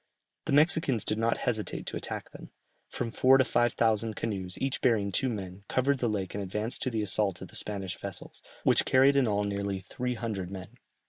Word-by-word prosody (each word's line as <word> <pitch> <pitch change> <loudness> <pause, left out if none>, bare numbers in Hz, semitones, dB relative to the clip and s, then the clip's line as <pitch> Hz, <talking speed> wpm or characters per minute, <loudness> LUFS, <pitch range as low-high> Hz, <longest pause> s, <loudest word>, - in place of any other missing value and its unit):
The - - -1
Mexicans 145 - +3
did 105 - -1
not 115 +1 +2
hesitate 110 -4 -2
to - - -4
attack - - -5
them; - - -11 0.4
from 115 -2 -3
four 130 +3 +5
to 130 - +5
five 120 -1 +2
thousand 110 -1 +1
canoes, 95 -5 -3
each 135 0 -1
bearing 105 -5 +2
two 130 +7 +2
men, 95 -3 -6
covered 135 +1 +2
the 120 - +1
lake 100 -4 -2
and 100 - -3
advanced 105 +5 -3
to 130 - 0
the 110 -3 -1
assault 100 -2 0
of - - -9
the - - -14
Spanish 95 -3 -4
vessels, 100 -3 -7 0.2
which - - +4
carried 135 +2 +5
in 135 -3 +4
all 105 -1 +1
nearly 100 -1 -2
three 125 +7 -3
hundred 110 -6 -3
men. 95 -1 -7
110 Hz, 205 wpm, -29 LUFS, 100-125 Hz, 0.4 s, four